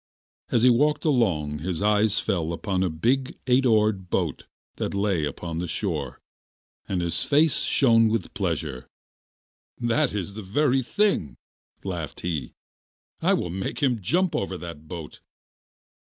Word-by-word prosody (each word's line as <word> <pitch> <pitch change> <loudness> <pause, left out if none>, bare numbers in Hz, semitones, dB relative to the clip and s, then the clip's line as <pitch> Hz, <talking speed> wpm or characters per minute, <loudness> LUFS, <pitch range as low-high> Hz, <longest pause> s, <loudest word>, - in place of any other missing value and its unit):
As 120 - +2
he 125 - +7
walked 150 +7 +2
along 90 - +1
his 85 +1 -3
eyes 105 +1 +3
fell 85 -6 -1
upon 95 +1 -2
a 95 - +1
big 125 +12 0
eight 130 0 +3
oared 105 -5 +2
boat - - -1 0.3
that - - -3
lay 100 -6 +1
upon 80 +3 -4
the 90 - -3
shore, 80 - -3 0.7
and 90 -2 0
his 85 0 0
face 150 +1 +3
shone 115 -4 +4
with 110 -4 -2
pleasure. 80 - -3 0.9
'That 125 +4 +1
is 100 -1 -3
the 110 - -6
very 130 +7 +2
thing,' 195 - 0 0.5
laughed 85 -6 -5
he, 80 -6 -3 0.7
'I - - +3
will 85 - -3
make 95 - -4
him 125 -5 +2
jump 175 - +1
over 95 -1 -2
that 80 -3 -9
boat. 80 -2 -8
100 Hz, 145 wpm, -25 LUFS, 85-120 Hz, 0.9 s, he